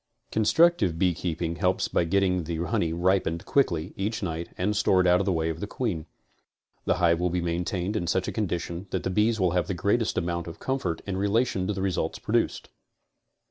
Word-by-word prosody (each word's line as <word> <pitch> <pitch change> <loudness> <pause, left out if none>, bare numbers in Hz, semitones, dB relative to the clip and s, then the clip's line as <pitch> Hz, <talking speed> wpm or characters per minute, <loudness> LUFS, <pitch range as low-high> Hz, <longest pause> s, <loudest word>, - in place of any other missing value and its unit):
Constructive 110 - +3
beekeeping 85 -2 -1
helps - - +1
by 85 - +1
getting 90 -1 +1
the 85 +1 -3
honey 85 0 0
ripened 85 -1 +1
auickly 85 - +1
each 105 +3 -2
night 85 -1 -3
and 100 +4 0
stored 95 -2 +3
out 90 0 +5
of 100 - -1
the - - +3
way 80 -2 0
of 80 - -7
the 100 - -4
queen. 100 -10 -3 0.8
The - - +2
hive 85 -2 +3
will 90 0 +1
then - - -6
be - - -3
maintained 90 +3 -2
in 85 -5 -1
such 95 +2 0
a - - -1
condition 90 -3 -3
that - - -2
the 95 - -1
bees 110 +4 +2
have 90 -3 +1
the 95 - -2
greatest 105 +6 0
amount 85 -1 -2
of 85 - -8
comfort 130 -12 -2
in 95 -2 -3
relation 100 -1 +1
to 105 - 0
the 95 -1 -3
results 95 -3 -1
produced. - - -1
90 Hz, 200 wpm, -26 LUFS, 85-100 Hz, 0.8 s, out